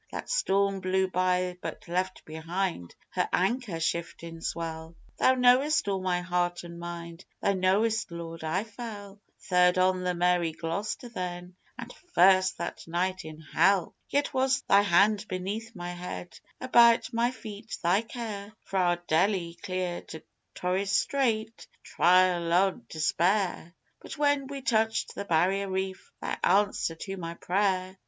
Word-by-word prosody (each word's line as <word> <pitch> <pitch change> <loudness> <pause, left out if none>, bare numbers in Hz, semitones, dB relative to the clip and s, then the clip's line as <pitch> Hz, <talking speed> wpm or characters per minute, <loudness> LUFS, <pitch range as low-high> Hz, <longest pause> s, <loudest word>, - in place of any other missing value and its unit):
That - - -5
storm 200 - +1
blew 190 0 +1
by 180 0 0
but - - -7
left 185 +2 -2
behind 165 - -4 0.2
her - - -1
anchor 195 -2 0
shiftin' 165 0 -3
swell, 165 0 -5 0.2
Thou 260 - +4
knowest 255 +3 +4
all 195 -1 -1
my 180 -1 0
heart 175 0 -1
an' 170 0 -9
mind, 170 0 -7 0.2
Thou 200 - +1
knowest, 205 +5 +1
Lord, 165 -1 -7
I 160 +5 0
fell. 210 -3 -9 0.2
Third 180 0 +3
on 185 0 +2
the 180 0 0
Mary 175 -2 +2
Gloster 185 +10 -4
then, 180 -4 -6 0.2
and 240 0 -8 0.2
first 185 0 +5
that 170 - -6
night 185 +2 -1
in 155 0 -10
Hell! 175 +3 +2 0.2
Yet 285 0 0
was 260 0 +2
Thy 200 - +5
hand 205 +2 +3
beneath 210 +5 -4
my 175 -1 -5
head: 175 0 -7 0.2
about 235 -2 +5
my 235 +1 +2
feet 220 -3 -8
Thy 180 +5 +3
care 220 -3 -7
Fra' 180 -3 +1
Deli 175 +1 +1
clear 185 -1 -3
to 160 - -10 0.3
Torres 190 +2 -1
Strait, 230 -2 +1 0.2
the - - -33
trial 180 -1 +3
o' 190 +3 +4 0.2
despair, 175 +2 0 0.3
But - - -9
when 285 -2 +2
we 275 -1 -7
touched 220 -2 +1
the 200 - -5
Barrier 190 +3 +1
Reef 190 0 -4
Thy - - -4
answer 200 -3 +2
to 195 +4 -6
my 170 -1 -6
prayer! 185 0 0
185 Hz, 145 wpm, -28 LUFS, 175-210 Hz, 0.3 s, first